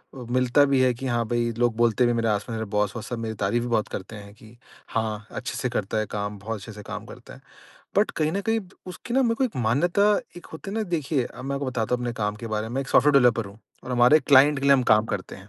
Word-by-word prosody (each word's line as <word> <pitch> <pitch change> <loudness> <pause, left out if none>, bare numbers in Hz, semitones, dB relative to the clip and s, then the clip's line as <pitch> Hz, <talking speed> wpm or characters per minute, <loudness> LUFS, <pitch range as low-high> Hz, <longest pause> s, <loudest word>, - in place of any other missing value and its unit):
अ, 125 -2 -8
मिलता 130 +2 +4
भी 140 -1 +2
है 130 -1 +3
कि 130 +3 -6
हाँ, 120 -2 0
भई 120 0 0
लोग 120 -2 +1
बोलते 120 +1 +3
भी - - +3
हैं - - 0
मेरे 115 -1 0
आस-पास 105 +1 -1
मेरे 110 0 -3
बॉस 105 0 0
वॉस 115 - -6
सब 120 - -3
मेरी 110 -1 -4
तारीफ़ 105 +4 0
भी - - -3
बहुत 110 -2 +1
करते 100 +3 -7
हैं 100 -1 -11
कि 110 +2 -17 0.3
हाँ, 110 -2 -3
अच्छे 125 0 -5
से 125 0 -1
करता 110 -3 -2
है 110 - 0
काम, 105 0 -4
बहुत 110 +2 -5
अच्छे 105 +3 -10
से 105 -1 -10
काम - - -6
करता - - -12
है। - - -14 0.6
बट - - +3
कहीं 155 0 -1
न 200 - -1
कहीं 225 0 +2 0.3
उसकी 185 +6 -7
ना 265 - +4
मेरे 230 -2 +2
को 265 - 0
एक 250 - -4
मान्यता 145 - +2 0.3
एक 175 - -11
होती 160 +5 -7
है 210 - -5
ना 220 - 0
देखिए, 155 - -1
अब 125 - -10
मैं 140 +1 -2
आपको 140 0 -3
बताता 125 -2 -1
हूँ 125 - -2
अपने 120 -1 -2
काम 105 0 -1
के 115 - -7
बारे 110 0 -3
में। 120 - -7
मैं 135 - 0
एक 135 - -6
सॉफ्टवेयर 150 - +4
डेवलपर 115 -3 +3
हूँ 100 +2 -13 0.3
और - - -7
हमारे 125 +5 +6
क्लाइंट 140 +1 +5
के - - -4
लिए 140 - +6
हम 135 -2 +4
काम 110 0 +4
करते - - -5
हैं। - - -15
120 Hz, 290 wpm, -25 LUFS, 110-140 Hz, 0.6 s, हमारे